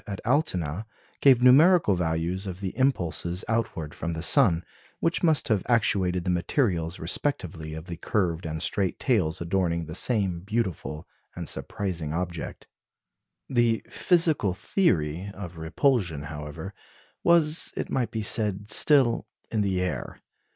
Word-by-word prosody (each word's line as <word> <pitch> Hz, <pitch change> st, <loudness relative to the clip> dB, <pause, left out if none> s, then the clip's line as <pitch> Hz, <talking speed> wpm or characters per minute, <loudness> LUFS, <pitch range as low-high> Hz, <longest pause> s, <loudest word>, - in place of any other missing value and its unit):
Pape -, -, -13 dB
at 100 Hz, +1 st, -6 dB
Altona 110 Hz, -, 0 dB, 0.3 s
gave 130 Hz, -3 st, +5 dB
numerical 150 Hz, -, +6 dB
values 85 Hz, +2 st, -1 dB
for 95 Hz, -, -4 dB
the 95 Hz, +1 st, -6 dB
impulses 90 Hz, -, -1 dB
outward 110 Hz, -9 st, -2 dB
from 85 Hz, 0 st, -4 dB
the 80 Hz, 0 st, -5 dB
sun, 90 Hz, -, +3 dB, 0.4 s
which 165 Hz, +1 st, 0 dB
must 160 Hz, -5 st, +3 dB
have 105 Hz, -4 st, +2 dB
actuated 95 Hz, -5 st, +1 dB
the 90 Hz, -, 0 dB
materials 90 Hz, -, 0 dB
respectively 80 Hz, -, -2 dB
of 80 Hz, +1 st, -8 dB
the 85 Hz, -2 st, -7 dB
curved 85 Hz, -2 st, -1 dB
and 80 Hz, 0 st, -3 dB
straight 95 Hz, -3 st, 0 dB
tails 90 Hz, -10 st, 0 dB
adorning 85 Hz, -1 st, 0 dB
the 80 Hz, -, -8 dB
same 95 Hz, -3 st, 0 dB
beautiful 95 Hz, -5 st, -3 dB, 0.3 s
and -, -, -6 dB
surprising 85 Hz, -7 st, -3 dB
object. 85 Hz, -1 st, -5 dB, 0.8 s
The 120 Hz, -3 st, +1 dB
physical 160 Hz, -, +2 dB
theory 90 Hz, -, 0 dB
of 90 Hz, -4 st, -8 dB
repulsion, 85 Hz, -, 0 dB
however, 75 Hz, +5 st, -7 dB, 0.5 s
was, 165 Hz, -2 st, +4 dB
it -, -, -4 dB
might 125 Hz, -3 st, 0 dB
be 110 Hz, -1 st, -4 dB
said, 105 Hz, -1 st, +1 dB
still 130 Hz, -1 st, +4 dB, 0.2 s
in 110 Hz, -, 0 dB
the 95 Hz, -2 st, 0 dB
air. 90 Hz, -, -4 dB
95 Hz, 140 wpm, -26 LUFS, 85-120 Hz, 0.8 s, numerical